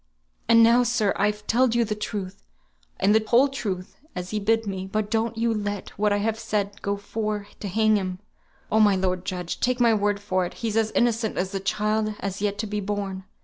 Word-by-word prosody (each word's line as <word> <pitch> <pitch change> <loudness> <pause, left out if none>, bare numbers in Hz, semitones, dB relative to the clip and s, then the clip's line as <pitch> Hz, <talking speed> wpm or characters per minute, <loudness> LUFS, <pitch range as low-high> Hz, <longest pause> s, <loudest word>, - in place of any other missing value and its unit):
"And 230 0 +7
now, 235 +2 +6
sir, 230 -4 +1
I've 210 +1 0
telled 240 +1 +2
you 235 -1 +3
the 210 - -2
truth, 205 -3 -5 0.6
and 205 - +4
the 220 0 +4
whole 245 +5 +5
truth, 200 -9 -5 0.2
as 180 0 -5
he 215 - -1
bid 225 +2 +1
me; 190 -1 -4
but 215 0 -1
don't 225 0 0
ye 230 +1 +1
let 205 -3 -2
what 210 +1 0
I 205 - +3
have 220 +2 -1
said 205 -3 -2
go 200 0 -1
for 210 0 -3
to 205 - -5
hang 215 +2 +3
him; 185 -2 -3 0.5
oh, 220 - +4
my 205 -2 +5
lord 185 -1 -1
judge, 180 -2 -4
take 250 0 +1
my 235 -2 +5
word 205 -1 +1
for 185 -2 0
it, - - -12
he's 225 -2 -3
as 225 -1 +2
innocent 230 -2 +1
as 185 +1 -1
the 195 - -2
child 215 +2 0
as 215 - -4
has 200 0 -4
yet 205 -1 0
to 215 - -2
be 210 0 -3
born. 195 -2 -4
210 Hz, 225 wpm, -25 LUFS, 200-225 Hz, 0.6 s, And